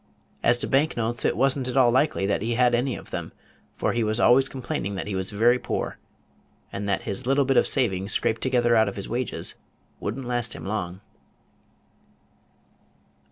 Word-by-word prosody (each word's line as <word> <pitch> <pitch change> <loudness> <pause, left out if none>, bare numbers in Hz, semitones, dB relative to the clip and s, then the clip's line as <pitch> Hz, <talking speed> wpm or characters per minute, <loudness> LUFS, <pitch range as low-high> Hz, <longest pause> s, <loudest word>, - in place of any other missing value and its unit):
As 120 - +3
to - - -1
bank 140 +2 +1
notes, 115 0 -1
it - - +1
was 135 +2 +3
n't 130 -3 -3
at 130 - -2
all 125 -2 +5
likely 130 -5 +1
that 100 0 0
he 115 +2 -1
had 125 0 +3
any 125 +2 +1
of - - -11
them; - - -5 0.4
for - - -1
he 120 -1 0
was 110 +1 0
always 130 +3 +5
complaining 120 -6 -4
that 95 - -4
he 105 - -4
was 95 0 -1
very 120 +4 +3
poor, - - -4 0.7
and 100 +1 -4
that 100 - 0
his 120 +6 -4
little 135 +1 +3
bit 135 0 +1
of - - +4
savings, 100 -7 +1
scraped 110 - +1
together 120 -2 +2
out 110 -2 +4
of 100 - -8
his 100 - -5
wages, 125 +2 -2 0.5
would 105 +5 -4
n't 135 - -6
last 120 -1 -1
him - - -9
long. 95 -3 -4
120 Hz, 200 wpm, -25 LUFS, 105-130 Hz, 0.7 s, all